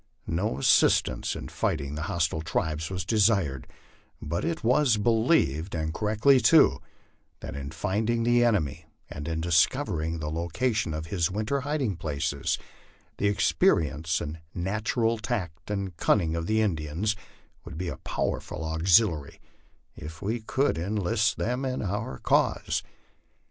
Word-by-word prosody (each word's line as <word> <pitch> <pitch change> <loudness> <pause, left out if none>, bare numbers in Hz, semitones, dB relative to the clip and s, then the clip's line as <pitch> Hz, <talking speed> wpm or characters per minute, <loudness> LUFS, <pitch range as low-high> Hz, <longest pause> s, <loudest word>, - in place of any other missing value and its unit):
No 80 -4 -1
assistance 70 - +3
in - - -6
fighting 70 -2 -2
the 75 - -4
hostile 80 -2 0
tribes 80 -1 -2
was 95 -1 -4
desired, 100 - +2 0.5
but 85 +4 -3
it 165 -1 -2
was 125 0 +3
believed, 105 - +2
and 80 -1 -2
correctly 110 +6 +3
too, 160 +4 +5 0.6
that - - -7
in 70 0 -5
finding 105 +8 -1
the 120 +1 +4
enemy 85 - 0 0.3
and 75 +2 -6
in 80 -1 -2
discovering 85 - +1
the 75 -1 -4
location 85 +3 -1
of 80 0 -4
his 85 -2 +1
winter 110 +8 -1
hiding 140 - -1
places, 75 -4 -2 0.6
the 100 0 +2
experi 80 -7 +2
ence 80 +1 -1
and 75 +2 -5 0.2
natural 110 +5 0
tact 85 -6 -4
and 100 -4 -3
cunning 85 -5 +2
of 85 0 -3
the 110 0 +2
Indians 90 +2 -1 0.5
would 75 - -9
be 90 +1 -3
a - - -6
powerful - - -3
auxil 85 +7 +4
iary 75 -3 -8 0.6
if 80 +1 -9
we 110 +6 -2
could 130 -4 0
enlist 105 +3 0
them 125 +4 -1
in 130 -3 -2
our 100 -8 -3
cause. - - +1
95 Hz, 145 wpm, -27 LUFS, 80-110 Hz, 0.6 s, too